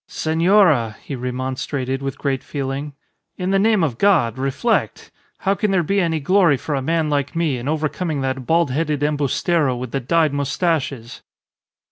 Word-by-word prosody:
"Senora!" 160 - +2
he 140 - -5
remonstrated, 130 +1 -3
with 135 -1 -4
great 135 -2 -2
feeling, 140 +1 -4 0.4
"in 185 0 -2
the 195 - +3
name 215 -2 +3
of 130 -7 -2
God, 140 - +3
reflect! 135 - -1 0.3
How 195 - +2
can 210 +1 -1
there 190 -3 +2
be 195 +5 +1
any 165 -2 0
glory 170 -1 +3
for 150 - -4
a 135 - 0
man 160 +3 0
like 145 -1 -1
me 160 -6 0
in 120 - -6
overcoming 155 0 -2
that 130 -1 -3
bald 165 -4 +2
headed 150 0 -1
embustero 150 0 +1
with 125 -1 -6
the 135 - -1
dyed 155 +3 +1
moustaches?" 140 -4 -2
145 Hz, 165 wpm, -20 LUFS, 135-170 Hz, 0.4 s, the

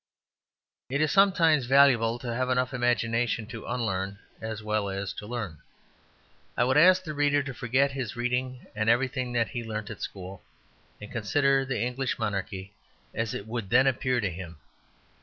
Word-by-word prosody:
It 140 +2 -1
is 155 0 +2
sometimes 165 -9 +4
valuable 125 -4 +5
to 120 -1 -5
have 130 +2 -1
enough 125 0 +1
imagination 120 -2 0
to 115 0 -9
unlearn 100 -5 -2 0.2
as 110 -1 -5
well 105 -1 -1
as 95 0 -3
to 105 - -8
learn. 105 -10 -5 1.0
I - - +4
would 130 +2 +2
ask 185 +4 +6
the 155 -4 -5
reader 145 0 +2
to 135 0 -6
forget 130 +4 +1
his 130 -6 -4
reading 125 +1 -2
and 110 +1 +1
everything 125 +1 +1
that 115 -2 +1
he 120 -2 -4
learnt 110 -1 -5
at 110 - -9
school, 95 -1 -7 0.6
and 105 - -10
consider 135 +4 +2
the 130 -1 -2
English 125 +2 -1
monarchy 100 -2 -3 0.4
as 115 -1 -2
it 100 - -5
would 110 -3 -4
then 130 +4 +5
appear 130 -1 +1
to 100 -5 -1
him. 85 -2 -8
120 Hz, 170 wpm, -27 LUFS, 110-130 Hz, 1.0 s, ask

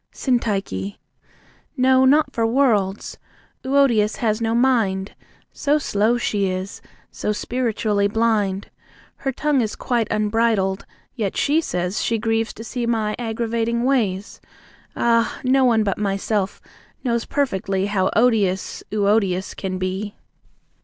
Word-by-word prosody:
SYNTYCHE. 195 - -1 0.8
No, 260 0 +4
not 295 +4 +3
for 230 -1 +1
worlds! 220 -6 +1 0.4
Euodias 260 -6 +3
has 220 -1 -1
no 225 0 0
mind; 220 -6 +1 0.4
So 295 +1 +1
slow 225 -4 +1
she 205 -4 0
is, 185 +1 -5 0.3
so - - -2
spiritually 215 -3 0
blind. 205 -3 0 0.5
Her 270 - -2
tongue 285 0 +1
is 215 -3 -2
quite 235 -4 -1
unbridled, 215 -2 +1 0.3
yet 210 -6 -2
she 305 +3 +2
says 180 - -2
She 230 - 0
grieves 225 0 0
to 225 - -9
see 235 +1 -3
my 220 -2 0
aggravating 235 0 -1
ways 220 -7 0 0.5
Ah, 230 -1 +1
no 260 +1 +3
one 225 -3 +3
but 200 -2 -1
myself 200 0 -1 0.4
knows 235 -3 0
perfectly 195 -8 -1
How 195 -2 +1
odious 210 -5 +1
Euodias 200 -3 +1
can 185 -1 -4
be! 190 +3 -3
220 Hz, 125 wpm, -21 LUFS, 200-240 Hz, 0.8 s, No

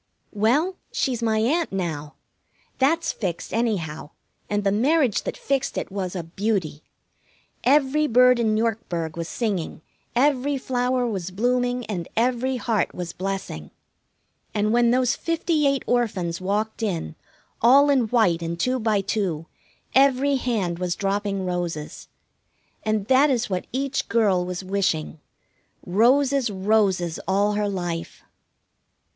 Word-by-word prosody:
Well, 275 - +1
she's 250 -4 -1
my 220 -1 +1
Aunt 315 +9 +1
now. 160 -6 -4 0.6
That's 325 +5 +2
fixed, 180 -6 -4
anyhow, 180 -11 -2 0.4
and 205 0 0
the 195 - +2
marriage 260 +2 +2
that - - -4
fixed 275 -1 -1
it - - -3
was 190 -2 -4
a 175 - -3
beauty. 180 -3 -2 0.8
Every 290 +3 +3
bird 250 0 +5
in 220 -2 +2
Yorkburg 200 -8 -2
was 170 -1 -4
singing, 195 -9 -3 0.3
every 280 +2 +2
flower 250 -1 0
was 190 -6 -3
blooming, 245 +4 0
and 175 -6 -4
every 255 +2 +1
heart 225 -4 -1
was 175 -2 -5
blessing; 190 - -5 0.9
and 210 +1 +1
when 240 0 +4
those 250 0 +2
fifty 330 -2 0
eight 275 -1 +1
orphans 190 -8 -1
walked 210 +4 -2
in, 175 - -2 0.5
all 275 +5 +6
in 255 -5 +2
white 210 -8 +2
and 170 0 -4
two 255 +4 +1
by 215 -3 +1
two, 195 -6 -2 0.5
every 275 +1 +4
hand 205 -9 -1
was 180 -1 -1
dropping 200 -1 -1
roses. 175 -4 -4 0.7
And 215 -2 -1
that 265 +5 +4
is 245 -5 0
what 180 -1 -2
each 275 +2 -2
girl 205 -6 +2
was 180 +1 -4
wishing: 185 -5 -1 0.7
Roses, 255 +6 +3
roses 190 -4 +1
all 200 +2 +2
her 210 0 0
life! 175 -3 -4
215 Hz, 135 wpm, -24 LUFS, 185-250 Hz, 0.9 s, all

